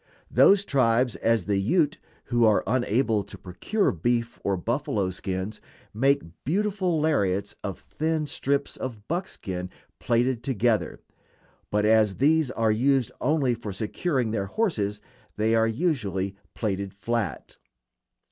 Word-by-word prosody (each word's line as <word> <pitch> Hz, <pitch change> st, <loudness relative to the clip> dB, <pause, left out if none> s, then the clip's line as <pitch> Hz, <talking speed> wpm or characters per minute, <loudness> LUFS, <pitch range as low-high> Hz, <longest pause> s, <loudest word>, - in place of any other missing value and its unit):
Those 200 Hz, 0 st, +5 dB
tribes, 125 Hz, -, +2 dB
as 115 Hz, -5 st, +1 dB
the 100 Hz, -1 st, +1 dB
Ute, 150 Hz, -, +1 dB, 0.2 s
who 120 Hz, -1 st, +1 dB
are 110 Hz, -2 st, +4 dB
unable 120 Hz, -1 st, +1 dB
to -, -, -10 dB
procure 95 Hz, -, -1 dB
beef 115 Hz, +7 st, -1 dB
or 100 Hz, -1 st, 0 dB
buffalo 105 Hz, -2 st, -1 dB
skins, 95 Hz, +2 st, -4 dB, 0.3 s
make 135 Hz, +6 st, +2 dB, 0.2 s
beautiful 185 Hz, 0 st, 0 dB
lariats 100 Hz, -11 st, +1 dB
of 100 Hz, -3 st, -4 dB
thin 155 Hz, 0 st, -2 dB
strips 140 Hz, -1 st, -1 dB
of 115 Hz, -5 st, -7 dB
buckskin 95 Hz, -, -4 dB, 0.3 s
plaited 120 Hz, +1 st, +1 dB
together; 115 Hz, -5 st, 0 dB, 0.7 s
but 105 Hz, 0 st, +1 dB
as 110 Hz, -2 st, +4 dB
these 155 Hz, +1 st, +3 dB
are 115 Hz, -3 st, +1 dB
used 130 Hz, +3 st, +2 dB
only 140 Hz, -3 st, +2 dB
for 115 Hz, -3 st, -6 dB
securing 115 Hz, -, -1 dB
their 100 Hz, -3 st, -1 dB
horses 105 Hz, -, -1 dB, 0.4 s
they 110 Hz, +2 st, +2 dB
are 115 Hz, 0 st, +4 dB
usually 110 Hz, -, -1 dB, 0.2 s
plaited 100 Hz, -3 st, -3 dB
flat. 110 Hz, -4 st, -3 dB
115 Hz, 130 wpm, -26 LUFS, 100-140 Hz, 0.7 s, Those